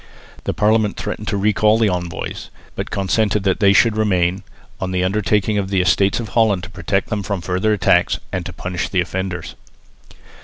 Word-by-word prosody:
The - - -1
Parliament 105 0 +2
threatened 105 - -5
to 100 - 0
recall 105 +2 +3
the 115 -1 +3
envoys, 90 -2 -4 0.2
but - - -5
consented 105 +1 0
that 95 -2 +1
they 100 -2 +5
should 105 +3 +4
remain, 95 -4 +1 0.4
on 95 - -3
the 90 -1 0
undertaking 105 +2 +1
of 95 -1 -3
the 95 -1 +1
Estates 95 +3 +2
of 115 -3 -5
Holland 105 -4 +2
to 90 - -8
protect 100 -1 -1
them 105 -1 -1
from 100 -1 -3
further 95 +5 0
attacks, 90 -3 +2
and - - -2
to - - -6
punish 90 -1 -4
the 95 - 0
offenders. 90 0 -4
100 Hz, 185 wpm, -19 LUFS, 90-105 Hz, 0.4 s, they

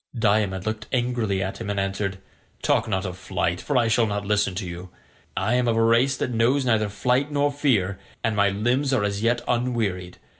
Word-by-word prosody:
Diomed 100 -3 +1
looked 110 0 -3
angrily 120 -6 0
at 95 - -5
him - - -4
and 100 -1 -1
answered: 95 0 -2 0.5
"Talk - - +2
not 95 -2 -1
of 90 0 -6
flight, 90 -2 -2
for 145 - 0
I 120 -2 +3
shall 115 0 +3
not 105 0 -3
listen 100 -2 +1
to 95 +1 -3
you: 90 +1 -7 0.5
I 105 +5 +1
am 125 0 +2
of 115 -1 +2
a 115 - +4
race 120 +4 +3
that 125 - -2
knows 125 +4 +2
neither 110 -3 +2
flight 125 +7 0
nor 145 0 +2
fear, 110 -10 +1 0.2
and 110 -1 0
my 100 -1 +3
limbs 120 +7 0
are 110 - +2
as 100 0 -1
yet 120 +1 +1
unwearied. 115 -8 -1
110 Hz, 210 wpm, -24 LUFS, 100-120 Hz, 0.5 s, a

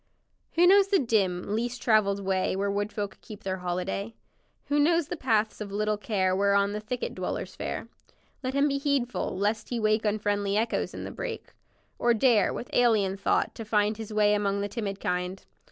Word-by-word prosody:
Who 345 +1 +5
knows 395 +2 +6
the 395 0 +3
dim, 200 - 0
least 240 +2 -2
traveled 200 -3 +2
way 190 -1 +1
Where 200 +1 0
wood 205 +1 -1
folk 205 -2 -5
keep 215 - -11
their 190 -1 -2
holiday; 180 +4 -3 0.5
Who 290 +1 +1
knows 330 +1 +3
the - - -2
paths 220 -8 0
of 205 -2 -5
little 210 +1 0
care 190 -4 0
Whereon 200 +1 +2
the 210 - -2
thicket 240 +4 -4
dwellers - - -4
fare, - - -4 0.5
Let 260 0 -3
him 280 +1 +4
be 275 -1 0
heedful, 275 -8 -1
lest 215 +2 -1
he 240 - -2
wake 215 0 +2
Unfriendly 205 -1 0
echoes 225 +1 -1
in - - -6
the - - -6
brake, - - -6 0.5
Or 240 -1 +3
dare, 225 -3 +4
with 245 - -6
alien 215 -6 +3
thought, 195 - 0
to 225 - -7
find 210 0 +1
His 220 -1 -7
way 210 -1 +3
among 200 -1 0
the 205 - -1
timid 200 -2 -4
kind. 180 +1 -3
210 Hz, 190 wpm, -27 LUFS, 200-240 Hz, 0.5 s, knows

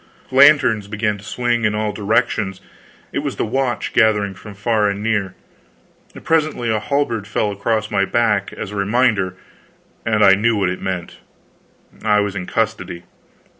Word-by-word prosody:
Lanterns 130 -6 +5
began 105 0 -2
to - - -14
swing 120 +2 -1
in 105 -1 +1
all 105 0 -1
directions; 105 -2 0 0.5
it - - -2
was - - -3
the - - -1
watch 125 +1 -2
gathering 105 -3 +3
from 105 +2 -12
far 105 0 +1
and 100 +1 -4
near. 105 -4 -1 0.9
Presently 155 -7 +1
a 110 - +1
halberd 115 -4 -1
fell 105 +2 -1
across 110 +2 -1
my 100 -2 +2
back, 105 -1 +1
as 105 - -7
a - - -7
reminder, 100 -2 +1 0.7
and 110 -1 +2
I 95 - +8
knew 110 +4 +2
what 95 -3 +1
it 90 - -6
meant. 95 -2 -4 0.9
I 105 -1 +3
was 105 -1 -1
in 90 - -5
custody. 110 -6 -2
105 Hz, 160 wpm, -19 LUFS, 100-115 Hz, 0.9 s, I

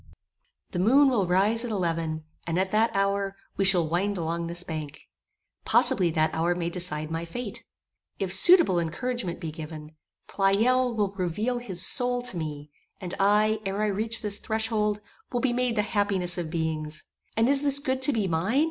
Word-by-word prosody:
The 175 - -3
moon 270 +9 +4
will 205 -7 0
rise 205 +6 +2
at 240 - -4
eleven, 165 -5 -2 0.2
and 165 0 -2
at 190 0 -1
that 220 +2 +2
hour, 195 0 -1 0.2
we 195 - 0
shall 180 -4 +3
wind 190 +5 -1
along 170 0 -3
this 170 +1 -2
bank. 155 -4 -7 0.6
Possibly 180 -2 +4
that 160 -1 0
hour 170 +2 0
may 170 -1 -3
decide 160 -3 -3
my 165 +1 -3
fate. 205 +6 -7 0.5
If 190 -2 -1
suitable 315 - +7
encouragement 175 +3 -4
be 165 -3 -6
given, 155 -1 -9 0.4
Pleyel 235 +6 +1
will 205 -3 -1
reveal 210 +7 -2
his 190 -7 +1
soul 245 0 +3
to 245 -8 +1
me; 150 -2 -6 0.3
and 180 -1 -5
I, 210 +2 +2
ere 195 0 -4
I 215 - +1
reach 220 +3 -2
this 205 -1 -1
threshold, 220 -2 -2 0.3
will 245 - -1
be 260 -2 0
made 245 -1 -1
the 210 - +1
happiest 200 -4 -1
of 165 -2 -4
beings. 155 -2 -2 0.3
And 225 +1 +3
is 275 0 +6
this 280 -1 +3
good 265 -2 -2
to 265 - +5
be 220 -6 -1
mine? 185 +10 0
195 Hz, 180 wpm, -26 LUFS, 170-225 Hz, 0.6 s, suitable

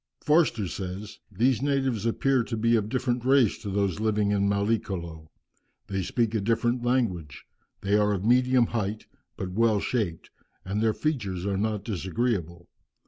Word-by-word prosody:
Forster 150 - +3
says, 95 +3 -6
"These 120 +6 +2
natives 135 -6 0
appear 130 +2 +2
to 115 - -4
be 115 +2 +3
of 105 -2 0
different 125 -1 -1
race 130 -4 +3
to 105 - -6
those 100 -1 0
living 105 -2 +1
in 100 -1 +2
Mallicolo. 95 -6 -2 0.6
They 95 -1 -2
speak 115 +4 0
a 110 - 0
different 120 +3 +1
language. 110 - -1 0.4
They 100 +1 +1
are 105 0 +2
of 100 -1 -2
medium 125 +1 +4
height, 110 -2 -3 0.3
but 95 -1 -4
well 110 +1 +2
shaped, 100 -8 -2 0.3
and 100 +3 -2
their 110 -1 +2
features 100 - -2
are 100 -1 0
not 105 -1 -1
disagreeable. 95 -4 -2
110 Hz, 155 wpm, -27 LUFS, 100-120 Hz, 0.6 s, medium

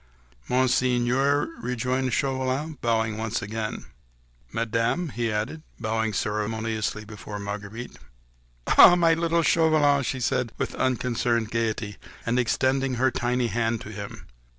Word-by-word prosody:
"Monseigneur," 130 +2 +2
rejoined 125 +2 -1
Chauvelin, 135 +4 -1
bowing 110 -2 0
once 115 +1 -1
again. 110 +1 -4 0.7
"Madame," 115 +9 0
he 115 -2 -2
added, 110 +9 -3 0.2
bowing 110 0 -1
ceremoniously 110 +1 -2
before 105 -1 -8
Marguerite. 100 +3 -6 0.8
"Ah! 175 - +10
my 170 -2 +4
little 165 0 +1
Chauvelin!" 155 -4 +4
she 130 0 -2
said 120 -1 0
with - - -2
unconcerned 120 -3 0
gaiety, 110 -2 -2 0.3
and 120 +2 +1
extending 130 +2 +1
her 130 +2 +2
tiny 125 +1 0
hand 115 +1 0
to - - -8
him. 100 -1 -8
120 Hz, 120 wpm, -25 LUFS, 110-130 Hz, 0.8 s, Ah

